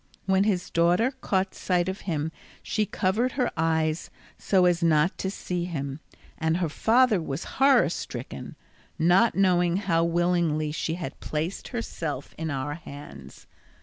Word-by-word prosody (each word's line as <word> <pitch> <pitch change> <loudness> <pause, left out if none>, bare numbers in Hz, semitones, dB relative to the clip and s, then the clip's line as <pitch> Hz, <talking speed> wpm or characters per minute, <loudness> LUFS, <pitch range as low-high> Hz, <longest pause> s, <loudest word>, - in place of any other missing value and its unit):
When 190 +1 +3
his 190 -4 0
daughter 175 +9 +3
caught 195 -8 -1
sight 180 -1 0
of 190 +1 -4
him 155 -1 -1 0.3
she 215 -2 0
covered 215 +9 0
her 255 -3 0
eyes 160 0 0 0.3
so 185 -2 +2
as 175 -1 +3
not 165 +1 +3
to 190 - -1
see 180 -3 -3
him, 140 -5 -4 0.4
and 160 0 +1
her 175 -3 0
father 225 - +3
was 135 -3 -4 0.2
horror 275 0 +6
stricken, - - -6 0.4
not 180 +7 +4
knowing 180 -2 +3
how 170 -5 +1
willingly 170 -3 +1
she 160 +1 -2
had 165 -6 -6
placed 160 +5 -3
herself 160 - -4
in 160 0 -4
our 140 0 -2
hands. 140 - -11
175 Hz, 150 wpm, -26 LUFS, 155-190 Hz, 0.4 s, horror